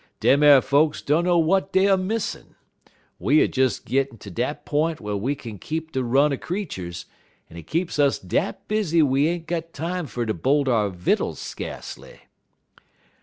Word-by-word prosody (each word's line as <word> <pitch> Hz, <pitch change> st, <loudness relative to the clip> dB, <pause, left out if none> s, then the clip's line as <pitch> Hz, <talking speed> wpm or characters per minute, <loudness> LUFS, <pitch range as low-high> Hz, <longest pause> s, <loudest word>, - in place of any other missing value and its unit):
Dem 140 Hz, +2 st, +4 dB
ar 145 Hz, -3 st, +8 dB
folks 150 Hz, +3 st, +2 dB
dunner 170 Hz, +4 st, +2 dB
w'at 170 Hz, +4 st, +2 dB
dey 190 Hz, +1 st, +3 dB
er 195 Hz, -, +5 dB
missin'. 200 Hz, +4 st, -3 dB, 0.6 s
We 150 Hz, +3 st, +3 dB
er -, -, +2 dB
des 130 Hz, 0 st, +2 dB, 0.2 s
gittin' 135 Hz, -2 st, -1 dB
ter 100 Hz, -1 st, -11 dB
dat 145 Hz, -, -3 dB
p'int 155 Hz, +2 st, 0 dB
whar 105 Hz, -1 st, -4 dB
we 125 Hz, +9 st, -1 dB
kin 115 Hz, -7 st, -9 dB
keep 160 Hz, -, -5 dB
de 130 Hz, -3 st, -1 dB
run 140 Hz, +4 st, +3 dB
er -, -, -2 dB
creeturs, 95 Hz, -, -5 dB, 0.5 s
en -, -, -12 dB
it 85 Hz, -2 st, -10 dB
keeps 165 Hz, -2 st, -2 dB
us 140 Hz, -2 st, +3 dB
dat 90 Hz, -, -3 dB
busy 185 Hz, -7 st, +2 dB
we 140 Hz, +1 st, +2 dB
ain't 170 Hz, 0 st, -3 dB
got 165 Hz, -1 st, -4 dB
time 170 Hz, +2 st, -3 dB
fer 120 Hz, -2 st, -3 dB
ter 110 Hz, -, -1 dB
bolt 135 Hz, -, +1 dB
our 110 Hz, -5 st, +2 dB
vittles 90 Hz, -1 st, -1 dB
skacely. -, -, -8 dB
145 Hz, 175 wpm, -23 LUFS, 125-165 Hz, 0.6 s, ar